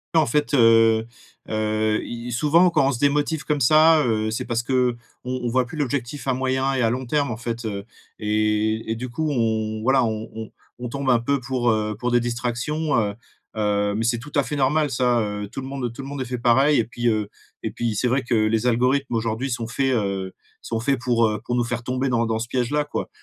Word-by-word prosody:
Et - - +7
en 155 - +2
fait, 150 +5 0
heu 115 -3 +5 0.4
heu 110 0 0
et 120 +1 -6
souvent, 155 +8 +4
quand 155 -5 +2
on - - +2
se 125 - -4
démotive 145 +1 +1
comme 145 0 0
ça, 155 +4 +6
heu, 110 -2 0
c'est 110 - -3
parce 115 0 -1
qu'on 125 -1 +1 0.3
on 125 -1 -3
voit 130 +1 +2
plus 125 - -10
l'objectif 140 -1 -3
à 130 - +2
moyen 130 +1 0
et 130 - +1
à 115 - +2
long 130 +2 -3
terme, 140 -1 0
en 110 - -4
fait, 115 0 -5
heu 100 -2 -4 0.4
et 110 +1 0
et - - 0
du 125 +3 -5
coup, 155 +5 -2
on 110 -3 -1
voilà, 130 +2 +3
on 110 0 -3
on 110 -1 -7 0.3
on 125 0 -5
tombe 140 +1 -2
un 120 -2 +5
peu 140 +4 0
pour, 125 -1 -1
heu, 110 -1 -1
pour 125 +1 -1
des 120 - +4
distractions, 120 +6 -2
heu 105 -2 -1 0.4
heu, 105 -1 0
mais 110 - -1
c'est 120 +1 +1
tout 145 +5 -11
à 145 - +5
fait 150 - -4
normal, 145 +2 +2
ça. 125 -1 +2
Heu, 105 -1 -3
tout 120 - -7
le 130 - -7
monde 135 -3 -4
tout 135 - -8
le - - -7
monde 140 -1 -5
est - - -2
fait 125 0 -4
pareil 135 +5 +4
et 115 - +1
puis, 120 +1 -3
heu 110 -3 +1 0.4
et - - -2
puis 115 -2 -2
c'est 125 - +1
vrai 130 +3 +1
que 120 0 0
les 110 +2 +2
algorithmes 125 +2 +1
aujourd'hui 115 +4 -1
sont 120 -2 -3
faits, 135 +2 0
heu, 100 -3 -2 0.3
sont 115 - -3
faits 135 +1 0
pour, 120 -2 +2
heu, 105 -1 -3
pour 120 - -2
nous 120 - +2
faire 120 0 -3
tomber 130 +2 -1
dans 115 -1 +1
dans 110 0 0
ce 115 - -4
piège-là, 130 +4 0
quoi. 145 - -4
120 Hz, 240 wpm, -23 LUFS, 110-135 Hz, 0.4 s, Et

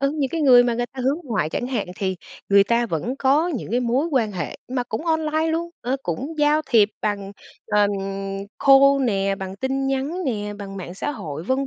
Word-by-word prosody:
ừ, 275 0 +2
những 275 -3 0
cái 330 - -2
người 250 -4 +7
mà 240 -1 +1
người 240 +1 -1
ta 260 - -6
hướng 280 +4 +1
ngoại 215 - -1
chẳng 245 - -2
hạn 250 -5 -2
thì 190 -2 -2 0.3
người 200 0 +6
ta 235 +2 +1
vẫn 230 - -3
có 290 +6 +3
những 260 - -4
cái 245 +2 +1
mối 250 +5 +1
quan 250 -10 0
hệ 175 -5 -4 0.2
mà 250 - 0
cũng 240 +6 -5
online 315 -1 +1
luôn, 335 +1 -1
ờ, 255 +3 -1
cũng 265 - -4
giao 295 +1 +4
thiệp 215 -4 +5
bằng, 200 -2 -2 0.3
ờm, 205 -1 +3 0.7
call 275 0 +6
nè, 195 -3 +1
bằng 190 -1 -6
tin 270 +4 -1
nhắn 275 +7 -2
nè, 210 -4 -2
bằng 195 -1 -7
mạng 180 -2 -7
xã 195 - -3
hội, 155 - -6
vân 265 +5 0
245 Hz, 215 wpm, -22 LUFS, 205-275 Hz, 0.7 s, người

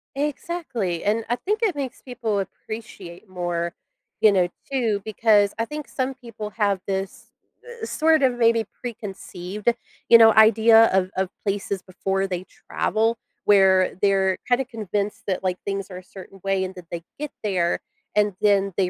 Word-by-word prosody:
Exactly, 275 - -3
and 220 +2 0
I 240 - +2
think 420 - -2
it 415 -8 +1
makes 270 -3 -5
people 230 -5 -2
appreciate 195 -2 -8
more, 175 -2 -2 0.5
you 215 - +7
know, 185 -3 +3 0.2
too, 230 -7 0
because 215 -2 +3
I 225 - +1
think 300 +3 -7
some 260 0 -2
people 230 -5 -8
have 205 -2 +1
this, 195 0 -4 0.6
eh, - - 0
sort 315 -6 +2
of 250 -2 +3
maybe 230 -1 +3 0.2
preconceived, 210 -3 -3 0.4
you 230 - +10
know, 225 -1 +7
idea 225 +1 +7
of 190 0 +1
of 190 -1 0 0.2
places 200 -1 -2
before 195 +1 -2
they 185 -1 -4 0.2
travel, 225 +2 +1 0.3
where 190 -2 +5
they're 195 -2 +3
kinda 250 +2 +2
convinced 210 -4 -3
that, 190 -2 -1
like, 185 -1 0
things 195 0 -3
are 180 - -7
a 185 - -10
certain 195 +1 -13
way, 195 -1 +1
and 185 0 -4
then 180 -2 -11
they 170 -1 -5 0.2
get 300 -1 -4
there, 185 -5 +1 0.4
and 210 -1 +3
then 200 -2 +3
they 185 -2 +1
205 Hz, 165 wpm, -23 LUFS, 190-230 Hz, 0.6 s, you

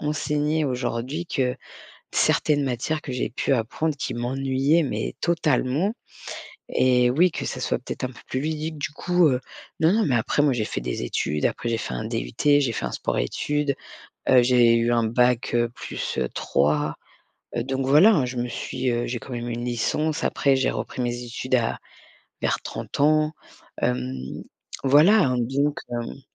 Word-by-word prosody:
enseigner 150 +1 0
aujourd'hui, 130 +5 -2
que 130 -4 -1 0.6
certaines 145 -2 +3
matières 135 +5 -1
que 130 - -7
j'ai 125 - -2
pu 130 - -1
apprendre 140 +6 -1
qui - - -3
m'ennuyaient, 135 +5 +1
mais - - -3
totalement 160 - +1 0.8
et 125 -1 +3
oui, 170 +6 +4
que - - -4
ça - - -4
soit - - 0
peut-être - - -5
un - - -1
peu 120 - -14
plus 130 - -2
ludique 155 0 -3
du - - -2
coup, 180 +2 +2
heu, 125 - +1 0.4
non, 160 +4 +4
non, 220 0 +2
mais 130 -5 +2
après 120 +5 +1
moi 140 -3 +3
j'ai 110 -3 -1
fait - - -4
des - - -3
études, 75 +4 -1
après 120 - -1
j'ai 115 - 0
fait 65 - -4
un - - -3
DUT, - - -4 0.3
j'ai 120 -5 0
fait - - -3
un - - -4
sport - - -2
études, 145 - -1 0.6
heu, 125 -1 +7
j'ai 120 -1 +5
eu 115 +1 +2
un 115 -1 +2
bac, 120 +1 +2
heu, 120 0 +2
+3, 75 - -1 0.6
heu, 120 - 0
donc 135 +1 -2
voilà, 155 - +6
je 125 0 -5
me 120 0 -2
suis, 130 +1 -3
heu, 120 0 0
j'ai 120 0 -3
quand 130 - -11
même 120 0 -4
une 120 0 -4
licence. 145 +6 -1
Après 140 -1 +2
j'ai 130 - +1
repris 125 - -4
mes 120 0 -2
études 130 +2 -1
à 115 -2 0 0.6
vers - - +1
30 - - -6
ans, 155 +1 +3 0.5
hem, 65 +1 -1 0.7
voilà, 155 +10 +6
hein, 125 -2 +1
donc 140 +5 0
hem 120 +3 -4
130 Hz, 180 wpm, -24 LUFS, 120-150 Hz, 0.8 s, heu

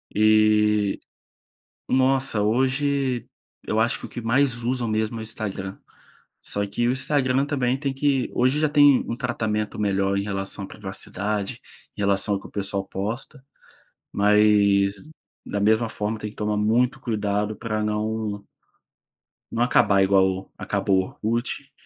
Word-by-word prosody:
e 105 -1 +3 0.9
nossa, 130 -4 +2
hoje, 130 +2 0 0.4
eu 110 - -1
acho 115 +1 +1
que - - -8
o - - -19
que - - -7
mais 120 +1 +1
usam 125 0 -1
mesmo 110 +1 -1
é - - -5
o - - -5
Instagram. 100 -3 -5 0.6
Só 100 0 -3
que 120 +4 -1
o - - +3
Instagram 130 0 +1
também 135 -3 0
tem 140 -1 -2
que 135 -1 +1
hoje 130 +4 +2
já 155 - +3
tem 145 -2 +5
um 115 - -1
tratamento 110 -5 -2
melhor 100 -1 +1
em 100 - 0
relação 100 0 -4
à - - -12
privacidade, 100 +1 -4 0.4
em - - -4
relação 100 +1 +1
ao - - -3
que - - -10
o - - -19
pessoal 100 -1 -2
posta, 115 +9 -5 0.7
mas, 100 0 +3 0.4
da 100 - -3
mesma 110 +3 +3
forma 105 +1 -3
tem 105 - -5
que - - -22
tomar 105 0 -1
muito 120 +5 +2
cuidado 105 -3 -1
pra 110 -1 -3
não 105 -1 -2 1.1
não 115 +1 +1
acabar 100 -5 +4
igual 95 -1 +2
acabou 95 -1 -1
o 110 - -1
Orkut. 130 +3 -3
110 Hz, 150 wpm, -24 LUFS, 100-125 Hz, 1.1 s, tem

